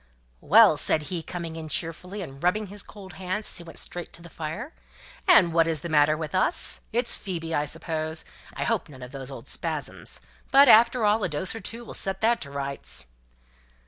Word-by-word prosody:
"Well!" 205 - +6
said 155 - +3
he, 170 - -2
coming 165 -1 -6
in 160 -1 -7
cheerfully, 180 +5 -3
and 135 -4 -10
rubbing 195 +5 +1
his 205 - -4
cold 195 -3 -12
hands 185 +4 -2
as - - +1
he - - -9
went 165 -1 -12
straight 175 -1 -3
to 170 - -8
the 170 - -12
fire, 185 - -6 0.5
"and 185 - +6
what 165 -1 +4
is 160 -3 -1
the 170 - -5
matter 150 +1 +4
with 155 +1 -5
us? 185 - +2
It's 235 +2 +1
Phoebe, 165 -4 -5
I 145 - +1
suppose? 160 +1 -3 0.3
I - - -2
hope - - -1
none 130 -3 -11
of 125 - -9
those 135 -2 -6
old 135 - -9
spasms? - - -3 0.3
But, 275 +1 +8
after 235 0 +6
all, 210 +1 +3
a - - 0
dose 150 +5 -1
or 225 - -6
two 230 +4 -7
will - - -9
set 190 0 -1
that 230 +2 +3
to 140 - -5
rights." 140 - -4
170 Hz, 210 wpm, -26 LUFS, 155-210 Hz, 0.5 s, But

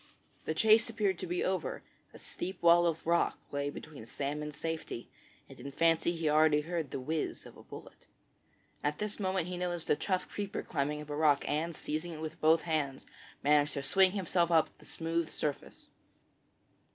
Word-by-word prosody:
The 160 - -1
chase 220 +5 +5
appeared 205 -5 0
to - - -4
be 175 +1 -1
over; 185 -3 -2 0.3
a - - -13
steep 185 -1 -6
wall 170 0 +6
of 165 -1 -2
rock 170 +1 +2
lay 140 0 -1
between 145 -3 -9
Sam 145 +4 -3
and 150 0 -4
safety, 160 -5 -5 0.4
and - - -14
in 140 +3 -7
fancy 165 +3 +2
he 165 -1 -1
already 150 0 +4
heard 165 -2 -3
the 135 - -4
whiz 155 +4 -3
of - - -12
a - - -13
bullet. - - -12 0.8
At 145 +1 0
this 210 0 -4
moment 190 -3 0
he 180 0 -4
noticed 175 -2 -2
a - - +6
tough 185 +3 -1
creeper 205 -1 -4
climbing 150 -1 -2
up - - -14
the - - -3
rock, 150 -2 +3
and, 160 +3 -1
seizing 155 +4 -3
it 155 - -8
with 155 0 -6
both 160 +1 +5
hands, 150 -5 -2 0.4
managed 150 +1 +3
to 140 - -3
swing 190 +6 +4
himself 175 -3 +1
up 165 -2 +3
the - - -17
smooth 165 0 -2
surface. 145 -2 -5
160 Hz, 190 wpm, -32 LUFS, 150-175 Hz, 0.8 s, wall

